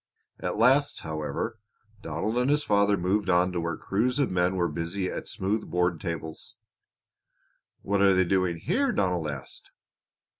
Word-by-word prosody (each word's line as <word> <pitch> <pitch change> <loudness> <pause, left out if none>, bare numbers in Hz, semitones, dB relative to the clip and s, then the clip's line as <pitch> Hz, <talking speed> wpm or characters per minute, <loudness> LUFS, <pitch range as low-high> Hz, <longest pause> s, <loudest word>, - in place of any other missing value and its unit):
At - - -3
last, 135 +6 +3
however, 80 +8 -4 0.4
Donald 80 +6 -3
and 125 +2 +1
his 145 +1 +2
father 100 -4 +3
moved 95 +3 0
on 90 0 +3
to 90 -1 -2
where 85 -1 -3
crews 120 +7 0
of 140 -3 +1
men 90 +1 +1
were 90 -2 +1
busy 85 +4 -3
at - - -6
smooth 105 +3 -2
board 90 0 0
tables. 80 -3 -6 1.3
"What 100 0 +1
are 100 -1 +5
they 95 0 +3
doing 90 -2 +1
here?" 270 - 0
Donald 90 - 0
asked. 70 -3 -8
95 Hz, 155 wpm, -27 LUFS, 85-105 Hz, 1.3 s, are